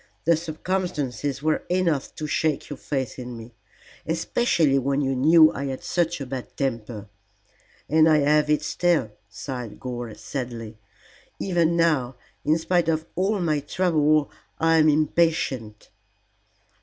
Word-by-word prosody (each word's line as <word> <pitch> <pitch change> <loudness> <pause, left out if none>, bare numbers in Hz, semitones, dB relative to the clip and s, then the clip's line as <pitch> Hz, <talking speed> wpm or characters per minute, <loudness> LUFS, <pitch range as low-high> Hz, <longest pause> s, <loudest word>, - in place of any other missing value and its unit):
The 170 +1 +5
circumstances 155 -5 -3
were 155 0 +1
enough 175 -6 0
to 155 - -5
shake 150 -1 -1
your 145 - -5
faith 135 -3 -4
in 125 -1 -7
me, 115 +1 -11 0.5
especially 165 - +1
when 140 +2 0
you 135 -1 0
knew 155 +4 +6
I 140 - -4
had 135 -1 -5
such 175 -2 0
a 135 - -4
bad 130 -1 -7
temper. 115 -5 -3 0.8
And 160 +1 +4
I 155 - +5
have 150 +1 +3
it 150 - +2
still," 170 -11 +1 0.2
sighed 120 +2 -7
Gore, 120 -4 -6
sadly; 115 0 -6 0.6
"even 170 -3 +1
now 145 -7 +1 0.3
in 155 +2 +3
spite 170 0 +1
of 160 0 0
all 195 +3 0
my 155 -4 +1
trouble 155 -1 +1 0.3
I 165 0 +3
am 155 -1 +5
impatient." 150 -8 0
150 Hz, 140 wpm, -24 LUFS, 130-165 Hz, 0.8 s, knew